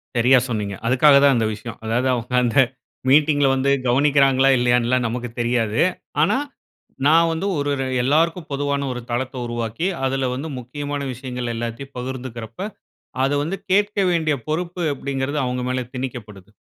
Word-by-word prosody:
சரியா 125 Hz, +2 st, +5 dB
சொன்னீங்க. 105 Hz, -3 st, -2 dB
அதுக்காக 140 Hz, +3 st, +5 dB
தான் 140 Hz, -2 st, +5 dB
இந்த 110 Hz, -, +1 dB
விஷயம். 110 Hz, +2 st, -8 dB
அதாவது 120 Hz, +4 st, 0 dB
அவ்ங்க 125 Hz, +1 st, -3 dB
அந்த 120 Hz, 0 st, 0 dB, 0.5 s
மீட்டிங்‌ல 145 Hz, 0 st, +4 dB
வந்து 135 Hz, +1 st, +1 dB, 0.2 s
கவ்னிக்கிறாங்களா, 135 Hz, 0 st, +4 dB
இல்லயான்னு 120 Hz, -1 st, +2 dB
எல்லாம் 125 Hz, -1 st, +1 dB
நமக்கு 120 Hz, +1 st, -4 dB
தெரியாது. 115 Hz, -2 st, +1 dB, 0.4 s
ஆனா 170 Hz, -, +2 dB, 0.7 s
நான் 165 Hz, +2 st, +5 dB
வந்து 170 Hz, +5 st, -2 dB
ஒரு 145 Hz, 0 st, -1 dB
ர -, -, 0 dB, 0.2 s
எல்லாருக்கும் 165 Hz, +5 st, +1 dB
பொதுவான 140 Hz, 0 st, -1 dB
ஒரு 125 Hz, -1 st, -5 dB
தளத்த 130 Hz, +2 st, -2 dB
உருவாக்கி, 120 Hz, -, -3 dB, 0.2 s
அதுல 135 Hz, 0 st, 0 dB
வந்து 140 Hz, +5 st, -4 dB
முக்கியமான 145 Hz, +3 st, -5 dB
விஷயங்கள் 125 Hz, -1 st, -5 dB
எல்லாத்தயும் 120 Hz, +4 st, -5 dB
பகிர்ந்துக்குறப்ப 125 Hz, -, -6 dB, 0.6 s
அத 135 Hz, -, +2 dB
வந்து 165 Hz, +6 st, -2 dB, 0.2 s
கேக்க 205 Hz, +1 st, +2 dB
வேண்டிய 160 Hz, -4 st, +1 dB
பொறுப்பு 175 Hz, +3 st, -3 dB
அப்டீங்கிறது 140 Hz, +1 st, -3 dB
அவங்க 125 Hz, 0 st, -2 dB
மேல 130 Hz, 0 st, -1 dB
திணிக்கப்படுது 110 Hz, -6 st, -7 dB
130 Hz, 150 wpm, -21 LUFS, 120-145 Hz, 0.7 s, சரியா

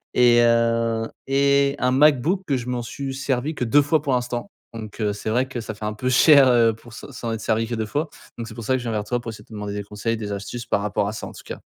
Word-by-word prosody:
et 120 Hz, -1 st, +6 dB
heu 115 Hz, -1 st, +2 dB, 0.2 s
et 140 Hz, 0 st, +3 dB
un 125 Hz, 0 st, +2 dB
MacBook 150 Hz, +6 st, +3 dB
que 135 Hz, -3 st, +1 dB
je 125 Hz, 0 st, -6 dB
m'en 125 Hz, -1 st, -2 dB
suis 135 Hz, +3 st, -5 dB
servi 135 Hz, +2 st, -2 dB
que 125 Hz, -, -3 dB
2 145 Hz, +5 st, +4 dB
fois 150 Hz, +1 st, +1 dB
pour 140 Hz, -3 st, -1 dB
l'instant. 125 Hz, -1 st, -2 dB, 0.2 s
Donc 110 Hz, -1 st, -8 dB
heu, 105 Hz, -1 st, +1 dB
c'est 105 Hz, -, -5 dB
vrai 125 Hz, +4 st, +1 dB
que 130 Hz, -3 st, -5 dB
ça 110 Hz, -1 st, -6 dB
fait 105 Hz, +1 st, -7 dB
un 105 Hz, -, -2 dB
peu 125 Hz, +4 st, -2 dB
cher, 140 Hz, +1 st, +7 dB
heu, 115 Hz, -2 st, +4 dB
pour 115 Hz, +1 st, -15 dB
se 140 Hz, -, -10 dB
s'en 120 Hz, -3 st, -5 dB
être 115 Hz, -, -4 dB
servi 110 Hz, +1 st, 0 dB
que 120 Hz, -, -3 dB
2 110 Hz, -1 st, -2 dB
fois. 145 Hz, +8 st, -2 dB, 0.3 s
Donc 115 Hz, -, -5 dB
c'est 110 Hz, -, -9 dB
pour 115 Hz, -, -7 dB
ça 130 Hz, -, +1 dB
que -, -, -1 dB
je 120 Hz, -1 st, -4 dB
viens 105 Hz, -2 st, -1 dB
toi 120 Hz, +3 st, -2 dB
pour 120 Hz, -, -7 dB
essayer 105 Hz, -1 st, -12 dB
de -, -, -29 dB
te -, -, -12 dB
demander 105 Hz, -1 st, -5 dB
des 105 Hz, -, -4 dB
conseils, 105 Hz, +3 st, -3 dB
des 105 Hz, -2 st, -5 dB
astuces 100 Hz, +5 st, -5 dB
par 100 Hz, -, 0 dB
rapport 105 Hz, -1 st, -1 dB
à 105 Hz, -, -3 dB
ça -, -, -6 dB
en -, -, -9 dB
tout -, -, -12 dB
cas. -, -, -7 dB
120 Hz, 295 wpm, -23 LUFS, 110-130 Hz, 0.3 s, cher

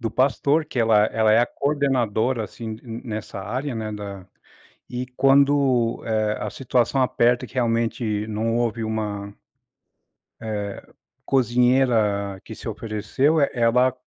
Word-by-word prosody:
do 115 Hz, -2 st, -2 dB
pastor, 140 Hz, +5 st, +2 dB
que 135 Hz, -, -6 dB
ela 110 Hz, -2 st, +4 dB
ela 110 Hz, -1 st, +2 dB
é 110 Hz, -, +5 dB
a 120 Hz, -, +2 dB
coordenadora, 130 Hz, -5 st, 0 dB
assim, 110 Hz, 0 st, -7 dB
n 115 Hz, -2 st, -7 dB
nessa 110 Hz, -4 st, -5 dB
área, 125 Hz, +7 st, -3 dB
né, 110 Hz, -1 st, -4 dB
da 100 Hz, -2 st, -7 dB, 0.6 s
e 125 Hz, +1 st, -4 dB
quando, 135 Hz, -4 st, +3 dB
eh, 110 Hz, -1 st, 0 dB
a -, -, -3 dB
situação 130 Hz, +1 st, 0 dB
aperta, 120 Hz, -1 st, +2 dB
que -, -, -17 dB
realmente 115 Hz, -3 st, 0 dB
não 110 Hz, +1 st, -1 dB
houve 115 Hz, -1 st, -1 dB
uma 105 Hz, -2 st, -4 dB, 1.0 s
eh, 110 Hz, -1 st, -4 dB, 0.7 s
cozinheira 120 Hz, -6 st, +2 dB
que -, -, -9 dB
se -, -, -9 dB
ofereceu, 115 Hz, +8 st, 0 dB
e 140 Hz, -, +3 dB
ela 125 Hz, +2 st, +3 dB
115 Hz, 135 wpm, -23 LUFS, 110-130 Hz, 1.0 s, é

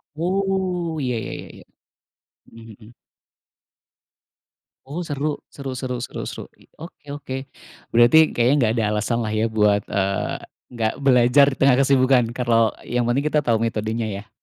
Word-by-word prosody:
Oh, 180 Hz, -1 st, -1 dB
iya, 125 Hz, -2 st, -1 dB
ya -, -, -6 dB
ya -, -, -11 dB
ya. -, -, -15 dB, 0.9 s
Mhm 115 Hz, 0 st, -13 dB
mhm. 110 Hz, +3 st, -16 dB, 1.9 s
Oh, 150 Hz, +6 st, -5 dB
seru. 150 Hz, -2 st, -3 dB
Seru 135 Hz, -2 st, -7 dB
seru 125 Hz, -1 st, -4 dB
seru -, -, -6 dB
seru. -, -, -7 dB, 0.2 s
I -, -, -20 dB
oke 165 Hz, 0 st, -12 dB
oke. 130 Hz, -2 st, -7 dB, 0.6 s
Berarti 120 Hz, +6 st, +6 dB, 0.2 s
kayaknya 120 Hz, +3 st, +3 dB
nggak 115 Hz, -3 st, +2 dB
ada 110 Hz, -, +1 dB
alasanlah 110 Hz, +1 st, -1 dB
ya 110 Hz, +1 st, +1 dB
buat, 105 Hz, -2 st, +2 dB
eee, 100 Hz, 0 st, -1 dB, 0.4 s
nggak 110 Hz, -1 st, 0 dB
belajar 130 Hz, +1 st, +5 dB
di 135 Hz, -, -5 dB
tengah 135 Hz, -2 st, +4 dB
kesibukan 130 Hz, -2 st, +4 dB
kalau 115 Hz, -3 st, +2 dB
yang 120 Hz, -1 st, -1 dB
penting 135 Hz, +5 st, 0 dB
kita 150 Hz, 0 st, +2 dB
tahu 115 Hz, -4 st, +1 dB
metodenya 110 Hz, 0 st, -2 dB
ya. 100 Hz, +3 st, -7 dB
125 Hz, 150 wpm, -22 LUFS, 115-140 Hz, 1.9 s, Berarti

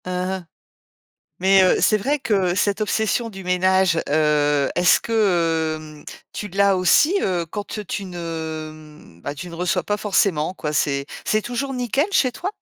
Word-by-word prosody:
Mmh, -, -, -6 dB
mh 185 Hz, 0 st, -3 dB, 0.9 s
mais 190 Hz, +1 st, +5 dB
heu, 185 Hz, -, +4 dB
c'est 215 Hz, -, +4 dB
vrai 280 Hz, +8 st, 0 dB
que, 245 Hz, -, -4 dB, 0.2 s
heu, -, -, -2 dB
cette 200 Hz, +1 st, 0 dB
obsession 220 Hz, +2 st, 0 dB
du 195 Hz, -3 st, -10 dB
ménage, 180 Hz, -1 st, +2 dB
heu, 150 Hz, -1 st, +2 dB
est-ce 175 Hz, 0 st, +4 dB
que, 230 Hz, -, -5 dB, 0.9 s
heu, -, -, -18 dB, 0.3 s
tu 210 Hz, -, -5 dB
l'as 200 Hz, 0 st, +2 dB
aussi, 295 Hz, -, +4 dB
heu, 180 Hz, -3 st, -1 dB
quand 205 Hz, +5 st, -6 dB
te 210 Hz, -, -6 dB
tu 200 Hz, 0 st, -5 dB
ne 155 Hz, -, -7 dB
ben 145 Hz, -, -4 dB
tu 175 Hz, +5 st, -8 dB
ne -, -, -9 dB
reçois 170 Hz, -1 st, -1 dB
pas 205 Hz, 0 st, -2 dB
forcément 190 Hz, -5 st, +1 dB
quoi? 150 Hz, -5 st, -4 dB
C'est 140 Hz, -2 st, 0 dB, 0.2 s
c'est 215 Hz, 0 st, +1 dB
toujours 255 Hz, +4 st, -3 dB
nickel 250 Hz, -, 0 dB
chez 260 Hz, -10 st, +2 dB
toi? 350 Hz, -, -4 dB
185 Hz, 175 wpm, -21 LUFS, 160-210 Hz, 0.9 s, mais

